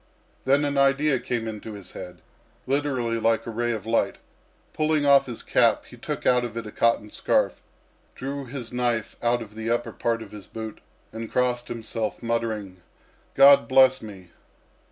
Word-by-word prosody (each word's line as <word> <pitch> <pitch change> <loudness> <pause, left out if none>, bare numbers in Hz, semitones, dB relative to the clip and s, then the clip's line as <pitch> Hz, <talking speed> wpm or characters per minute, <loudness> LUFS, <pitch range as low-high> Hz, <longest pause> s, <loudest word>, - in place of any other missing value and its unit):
Then 140 +2 +3
an 140 -1 0
idea 140 0 +3
came 115 -2 -3
into 110 0 -6
his 100 -3 -10
head, 90 -1 -10 0.4
literally 130 -4 0
like 115 0 +1
a 115 - -5
ray 120 +1 -1
of 110 -2 -4
light. 115 +1 +1 0.6
Pulling 155 -1 +1
off 140 -1 +6
his 120 -2 -6
cap, - - +3
he - - -13
took - - -5
out 125 -1 +4
of 115 -1 -5
it 115 - -4
a 105 - -7
cotton 115 -2 +1
scarf, - - 0 0.5
drew 140 +1 -5
his 125 -2 -7
knife 120 -3 -1
out 120 0 +1
of 105 -1 -14
the 110 +1 -4
upper 120 +1 0
part 115 -1 -1
of 105 - -14
his 105 -3 -10
boot, 110 -1 -7 0.3
and 115 0 -6
crossed 125 -1 0
himself, 115 -1 -4
muttering, 110 -5 -2 0.5
"God 140 -3 +7
bless 130 0 +5
me!" 95 -5 -11
115 Hz, 175 wpm, -25 LUFS, 110-130 Hz, 0.6 s, God